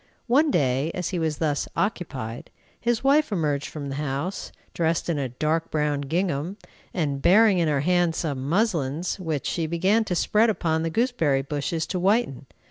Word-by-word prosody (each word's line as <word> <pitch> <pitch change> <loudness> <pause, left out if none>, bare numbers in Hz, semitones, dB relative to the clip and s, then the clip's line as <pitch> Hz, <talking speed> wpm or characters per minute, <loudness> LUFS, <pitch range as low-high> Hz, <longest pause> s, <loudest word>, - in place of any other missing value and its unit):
One 285 +6 +3
day 135 - +1
as 180 -2 -2
he 180 - -2
was 160 -2 -1
thus 150 -3 -1
occupied, 135 - -3 0.3
his 235 0 0
wife 285 0 +3
emerged 150 -7 0
from 145 -2 -6
the 135 - -4
house, 150 +6 -3 0.2
dressed 165 0 0
in 160 -4 0
a 135 -2 -2
dark 155 +6 -1
brown 150 -2 0
gingham, 165 +3 -2 0.3
and 145 -6 -2
bearing 205 +2 +5
in 165 - +2
her 145 -3 +1
hand 175 0 +2
some 140 -5 -3
"muslins," 170 - 0
which 160 -6 -3
she 165 -2 -1
began 190 +7 +2
to 180 - -2
spread 215 +6 +3
upon 160 -6 0
the 165 - -1
gooseberry 165 - +1
bushes 145 +3 -2
to 185 - -3
whiten. 190 - +1
165 Hz, 175 wpm, -25 LUFS, 145-190 Hz, 0.3 s, bearing